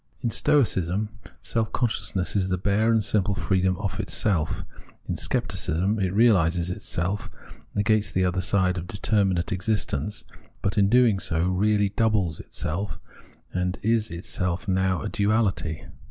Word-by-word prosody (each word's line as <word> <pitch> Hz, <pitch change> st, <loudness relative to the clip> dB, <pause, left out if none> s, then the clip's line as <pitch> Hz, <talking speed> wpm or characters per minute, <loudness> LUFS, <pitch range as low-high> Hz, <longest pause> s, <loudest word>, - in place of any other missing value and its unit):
In 120 Hz, -, -1 dB
Stoicism, 105 Hz, -, +1 dB, 0.3 s
self 115 Hz, -2 st, -1 dB
consciousness 100 Hz, -5 st, -1 dB
is 95 Hz, -2 st, +1 dB
the 90 Hz, -, 0 dB
bare 100 Hz, +5 st, +2 dB
and 110 Hz, -2 st, +3 dB
simple 100 Hz, -1 st, +1 dB
freedom 95 Hz, -2 st, +1 dB
of 100 Hz, 0 st, -4 dB
itself. 95 Hz, -7 st, 0 dB, 0.4 s
In -, -, -2 dB
Scepticism, 95 Hz, +7 st, 0 dB
it 95 Hz, -2 st, 0 dB
reaUses 90 Hz, -5 st, +3 dB
itself, 90 Hz, +2 st, -3 dB, 0.5 s
negates 105 Hz, +1 st, +2 dB
the 95 Hz, 0 st, +1 dB
other 90 Hz, +1 st, 0 dB
side 90 Hz, -1 st, +1 dB
of 85 Hz, -, -8 dB
determinate 100 Hz, -3 st, 0 dB
existence, 100 Hz, -3 st, -1 dB, 0.4 s
but, 95 Hz, -, 0 dB
in 100 Hz, -, +4 dB, 0.3 s
so 80 Hz, -3 st, -1 dB
doing, 90 Hz, +1 st, 0 dB
really 105 Hz, +1 st, +2 dB
doubles 100 Hz, -7 st, +1 dB
itself, 95 Hz, +6 st, -4 dB, 0.5 s
and 90 Hz, 0 st, -1 dB
is 115 Hz, 0 st, +2 dB
itself 90 Hz, +1 st, -3 dB
now 95 Hz, -1 st, +1 dB
a -, -, -2 dB
duaUty. 100 Hz, -7 st, 0 dB
95 Hz, 140 wpm, -25 LUFS, 90-105 Hz, 0.5 s, in